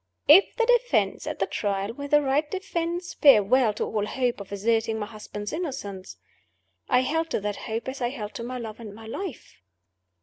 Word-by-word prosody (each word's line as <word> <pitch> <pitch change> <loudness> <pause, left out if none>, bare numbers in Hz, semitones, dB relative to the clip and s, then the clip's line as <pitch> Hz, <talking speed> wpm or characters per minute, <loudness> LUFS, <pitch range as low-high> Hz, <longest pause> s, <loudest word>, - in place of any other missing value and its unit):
If 340 +7 +7
the 465 - +2
Defense - - +2
at - - -3
the - - +1
Trial 200 +1 -2
were 285 +3 -6
the 295 +1 +4
right 285 +3 +1
defense, 350 -2 -3
farewell 250 -2 +5
to - - -2
all 210 -1 -2
hope 250 -2 -1
of 200 - -11
asserting 225 +2 0
my 210 - -3
husband's 210 -1 -7
innocence. 255 - -5 0.7
I 250 - +4
held 320 +5 -1
to - - 0
that 205 0 -2
hope 225 +3 -4
as 265 +1 -5
I 240 - +1
held 215 -6 -6
to 235 - -6
my 250 +2 -5
love 225 -2 -7
and 210 -3 -9
my 225 +1 -11
life. 305 - -7
240 Hz, 195 wpm, -26 LUFS, 210-300 Hz, 0.7 s, If